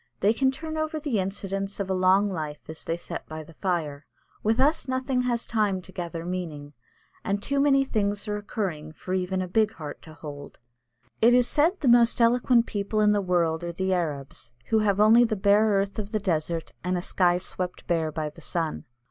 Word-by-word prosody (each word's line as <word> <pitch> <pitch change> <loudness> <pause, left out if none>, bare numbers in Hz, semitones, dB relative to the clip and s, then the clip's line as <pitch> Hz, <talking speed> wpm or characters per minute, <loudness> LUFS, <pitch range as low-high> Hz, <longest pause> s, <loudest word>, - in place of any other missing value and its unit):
They 205 +3 +4
can 265 +3 +2
turn 315 +4 -5
over 310 0 -2
the 285 -8 -1
incidents 195 +1 -3
of 200 - -2
a 190 - 0
long 185 +2 +4
life 155 -6 -5
as 160 0 -7
they 165 - -2
sit - - -6
by 155 0 -7
the 165 - -15
fire. 155 -5 -3 0.3
With 220 +3 +1
us 295 +4 +2
nothing 260 0 0
has 240 -2 -1
time 210 -4 0
to 185 - -12
gather 170 -2 -5
meaning, 160 -5 -5 0.5
and 200 +1 -1
too 280 0 0
many 275 -1 +4
things 205 -4 -1
are 210 - -1
occurring 185 -7 -4
for 185 +4 -6
even 185 0 -1
a - - -5
big 215 +3 +2
heart 150 -6 -8
to 155 -1 -13
hold. 145 -2 -9 0.6
It 235 +2 +6
is 250 -1 +4
said 330 +6 +2
the 280 - 0
most 235 -1 +5
eloquent 240 0 +4
people 205 0 -2
in 210 0 +5
the 205 -1 +2
world 175 -3 +1
are 170 - -3
the 190 +2 -1
Arabs, 140 -8 -3 0.2
who 220 - +3
have 205 -2 +1
only 220 +3 +7
the 225 -2 +1
bare 205 +2 +4
earth 200 +1 0
of 210 0 -4
the 215 - 0
desert 165 -3 -2
and 180 +1 0
a - - -2
sky 175 -2 +2
swept 180 0 -4
bare 165 -3 0
by 155 0 -3
the 165 - -15
sun. 165 -1 -2
195 Hz, 210 wpm, -26 LUFS, 170-225 Hz, 0.6 s, only